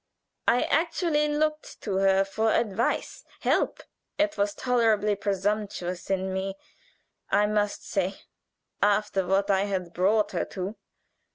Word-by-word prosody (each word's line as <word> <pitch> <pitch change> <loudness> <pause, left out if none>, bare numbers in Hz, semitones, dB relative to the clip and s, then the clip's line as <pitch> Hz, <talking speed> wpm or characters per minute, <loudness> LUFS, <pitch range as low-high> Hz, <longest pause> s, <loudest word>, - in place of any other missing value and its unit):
I 245 +2 +4
actually 325 -2 +1
looked 305 +1 -1
to 195 -3 -1
her 195 0 +4
for 220 +3 0
advice, 225 +1 0 0.2
help. - - +1 0.3
It 310 0 +1
was 205 0 0
tolerably 225 -4 +2
presumptuous 200 -2 -2
in 190 0 0
me, 190 +1 -3 0.7
I 210 - +4
must 210 -1 -1
say, 195 0 -1 0.7
after 205 -2 +2
what 195 +2 +2
I 195 0 +2
had 185 -4 -3
brought 205 +4 +2
her - - -1
to. 190 +3 -5
205 Hz, 125 wpm, -27 LUFS, 195-225 Hz, 0.7 s, I